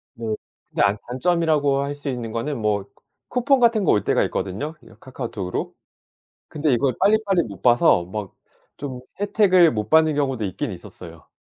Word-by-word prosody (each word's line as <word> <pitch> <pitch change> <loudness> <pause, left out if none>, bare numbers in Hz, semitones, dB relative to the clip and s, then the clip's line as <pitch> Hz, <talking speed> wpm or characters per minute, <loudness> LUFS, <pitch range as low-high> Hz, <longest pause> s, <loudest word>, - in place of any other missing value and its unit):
네. 115 - -7 0.4
근데 - - -2
아 100 0 +3
단점이라고 145 0 +1
할 140 +1 -3
수 145 0 -5
있는 120 -3 -4
거는 135 +6 -3
뭐 105 -2 0 0.5
쿠 250 - -1
쿠폰 275 +1 +4
같은 230 -3 +3
거 175 - +3
올 105 - +2
때가 - - +2
있거든요, 145 - -4
이 - - -16
카카오톡으로? 115 -8 -5 0.8
근데 150 -2 0
이걸 130 +1 +1
빨리빨리 205 -4 +3
못 100 -3 -10
봐서 120 -7 +4
막 105 -3 -5 0.5
좀 130 -3 -6 0.2
혜택을 195 - +4
못 105 -2 -3
받는 160 -1 +5
경우도 135 -6 -1
있긴 110 +8 -3
있었어요. 85 -3 -11
140 Hz, 335 characters per minute, -22 LUFS, 110-165 Hz, 0.8 s, 받는